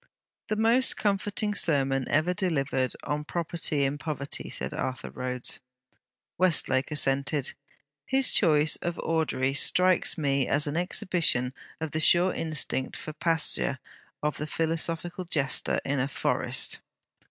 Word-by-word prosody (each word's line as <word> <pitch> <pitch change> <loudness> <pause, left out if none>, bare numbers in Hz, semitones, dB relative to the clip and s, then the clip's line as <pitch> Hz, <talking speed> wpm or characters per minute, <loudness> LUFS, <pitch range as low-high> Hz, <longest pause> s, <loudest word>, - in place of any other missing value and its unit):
'The 215 - -1
most 230 +4 +3
comforting 205 +1 0
sermon 135 -8 +1
ever 155 +4 +1
delivered 140 -9 -1
on 150 +1 -3
property 160 -2 -2
in 140 +2 -1
poverty,' 145 -3 -4
said - - -3
Arthur 130 0 -4
Rhodes. 125 -1 -2 0.8
Westlake 140 -7 +2
assented. 140 -1 +1 0.5
'His 265 0 +4
choice 155 -4 +4
of 175 -1 -4
Audrey 155 -5 0
strikes 180 +5 +3
me 140 -4 0
as 145 +1 +1
an 145 0 -3
exhibition 170 -7 +1 0.3
of 160 -2 -4
the 155 - -2
sure 175 +3 +5
instinct 150 -4 -2
for 155 - -7
pasture 160 -3 +1 0.5
of 150 0 -1
the 150 - -4
philosophical 165 +3 -1
jester 145 -6 0
in 140 0 -1
a 130 - 0
forest.' 140 - 0
155 Hz, 130 wpm, -27 LUFS, 140-175 Hz, 0.8 s, sure